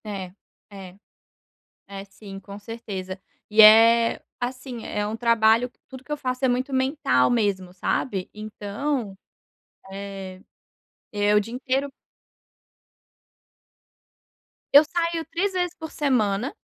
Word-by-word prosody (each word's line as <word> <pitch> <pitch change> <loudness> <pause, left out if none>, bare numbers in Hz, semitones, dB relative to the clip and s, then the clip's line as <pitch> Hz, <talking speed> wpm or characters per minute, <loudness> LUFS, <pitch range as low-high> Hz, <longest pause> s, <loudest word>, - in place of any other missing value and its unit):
É. 195 -4 -6 0.4
É. 190 -3 -11 0.9
É, 195 0 -8
sim, 195 0 -11
com 200 +1 -10
certeza. 200 -4 -7 0.3
E 215 +1 +5
é, 230 +2 +7 0.2
assim, 250 -1 -5
é 210 0 -2
um 215 +2 -4
trabalho, 230 0 +3
que - - -42
tudo 260 -1 -11
que - - -20
eu - - 0
faço 255 -1 -3
é - - +4
muito 255 +2 -1
mental 260 - +2
mesmo, 200 -6 -1
sabe. 190 +1 -2
Então, 215 +3 -4 0.8
eh, 195 -1 -8 0.7
é 205 0 +1
o - - +6
dia 220 +3 -6
inteiro 265 +2 -2 2.8
Eu 285 +2 +9
saio 335 0 -2
3 385 +5 -1
vezes 360 -2 -2
por 320 -1 -8
semana, 245 -4 0
225 Hz, 120 wpm, -24 LUFS, 200-260 Hz, 2.8 s, Eu